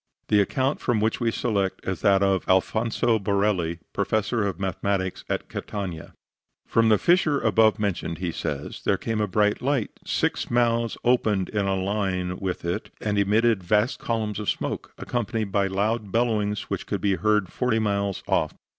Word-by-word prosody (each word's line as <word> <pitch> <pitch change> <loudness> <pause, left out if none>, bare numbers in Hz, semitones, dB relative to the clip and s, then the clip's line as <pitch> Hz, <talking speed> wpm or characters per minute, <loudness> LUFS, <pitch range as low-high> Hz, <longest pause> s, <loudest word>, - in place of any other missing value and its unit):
The 105 -1 +5
account 130 +7 0
from 120 -3 +1
which 110 +1 0
we 115 - +1
select 100 -5 -1
is 95 -3 -2
that 100 -1 +4
of 95 -1 +2
Alfonso 110 +4 +2
Borelli, 100 -4 0 0.2
Professor 110 +1 0
of 95 -4 -4
Mathematics 95 0 -2
in - - +2
Catania. 90 -6 -6 0.5
From 115 -1 +3
the 105 - +5
fissure 165 - +3
above 110 -1 +3
mentioned, 95 -5 -2
he 90 0 -2
says, 75 -2 -4
there - - +2
came 110 -1 -2
a 105 - +1
bright 105 +2 +1
light. 135 -4 0
Six - - -1
mouths 115 -1 +1
opened 110 -6 +2
in 105 -2 -1
a 95 - +1
line 95 -2 -1
with 95 -3 -3
it 85 - -2
and 105 -1 0
emitted 110 +1 +3
vast 105 +7 +1
columns 110 -3 -2
of 105 - -2
smoke, - - -3
accompanied 115 -3 -2
by 100 -1 +2
loud 105 +2 -1
bellowings 105 -3 +1
which - - -5
could 100 - -2
be 100 -2 +1
heard 105 -4 +2
forty 125 -3 +1
miles 100 -3 -1
off. - - +1
105 Hz, 170 wpm, -25 LUFS, 95-115 Hz, 0.5 s, The